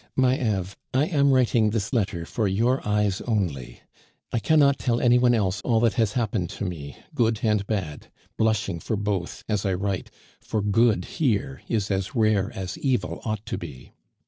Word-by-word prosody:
"My 130 -1 +4
Eve, 100 -7 -2 0.2
I 135 +3 +4
am 145 -5 +2
writing 120 -4 +3
this 105 +1 -2
letter 95 -8 0
for 110 +2 -1
your 115 +7 +1
eyes 105 -2 +1
only. 80 - -2 0.5
I 120 - +2
cannot 140 +3 +4
tell 120 -2 +1
any 125 0 +4
one 120 -1 +4
else 100 -3 0
all 115 -3 +2
that 115 -2 +3
has 110 -4 +1
happened 110 -7 -1
to - - -3
me, 75 -7 -6 0.2
good 115 -2 +1
and 105 -3 +1
bad, 95 -9 -3 0.3
blushing 110 -5 0
for 110 - -2
both, 100 -4 -3
as 105 -3 0
I 95 -2 0
write, 95 0 -2 0.3
for 110 -2 -2
good 105 -2 +3
here 135 - -1
is 105 -3 -1
as 95 +3 -2
rare 110 -3 +2
as 95 -1 -5
evil 125 -10 -1
ought 110 -1 -3
to - - -4
be. 65 - -10
105 Hz, 180 wpm, -25 LUFS, 95-120 Hz, 0.5 s, My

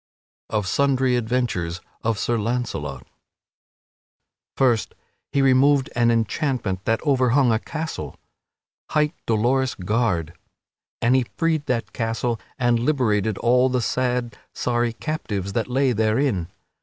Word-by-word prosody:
[Sidenote: 110 - +1
Of - - -6
sundry 130 +2 +2
adventures 110 -8 -1 0.2
of 115 -2 0
Sir 120 +3 0
Launcelot] 105 - -3 1.5
First 120 -5 +2 0.4
he 140 - +2
removed 135 +1 +4
an 120 -1 +3
enchantment 115 - -1
that 115 +5 0
overhung 130 -2 +3
a 110 - +2
castle, 160 +5 -5 0.7
hight 150 0 +1
Dolorous 125 +4 +1
Gard; 90 -5 0 0.7
and 120 +2 +4
he 130 -2 +2
freed 160 -3 0
that 120 -2 -1
castle 115 0 -1 0.2
and 120 -2 +2
liberated 110 -6 +1
all 125 +2 +3
the 125 0 +1
sad, 125 0 -1 0.2
sorry 120 -1 0
captives 105 - -4
that 115 - -1
lay 130 +1 +2
therein. 110 - +1
120 Hz, 120 wpm, -23 LUFS, 110-130 Hz, 1.5 s, removed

